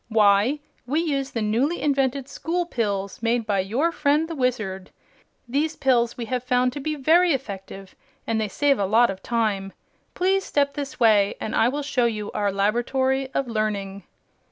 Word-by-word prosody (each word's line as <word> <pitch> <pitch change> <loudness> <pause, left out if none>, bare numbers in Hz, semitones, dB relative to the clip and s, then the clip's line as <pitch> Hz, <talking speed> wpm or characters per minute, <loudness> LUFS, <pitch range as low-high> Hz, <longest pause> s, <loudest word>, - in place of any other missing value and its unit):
"Why, 215 +6 +3 0.3
we 295 +5 +1
use 280 -5 -1
the 230 -5 -3
newly 250 +11 0
invented 275 -2 0
School 335 +5 -2
Pills, 200 - -3
made 230 0 0
by 205 -2 0
your 240 - 0
friend 300 0 +1
the 330 - -5
Wizard. 220 - -2 0.6
These 300 +6 -1
pills 240 -4 +1
we 240 - -4
have 250 +1 -2
found 250 0 +1
to 290 - -5
be 305 +2 -2
very 325 +4 +4
effective, 195 -6 -6 0.3
and 220 -1 0
they 215 - -1
save 280 +5 +1
a 200 - +1
lot 230 +2 +4
of 190 0 -9
time. 210 -5 -1 0.4
Please 380 +2 +1
step 280 -4 0
this 280 -2 -6
way 210 -4 +4
and 215 - -4
I 225 - +4
will 290 +3 -3
show 275 -4 +1
you 215 -3 -2
our 205 -1 0
Laboratory 260 +6 0
of 275 - 0
Learning." 205 -3 -2
245 Hz, 180 wpm, -24 LUFS, 210-280 Hz, 0.6 s, very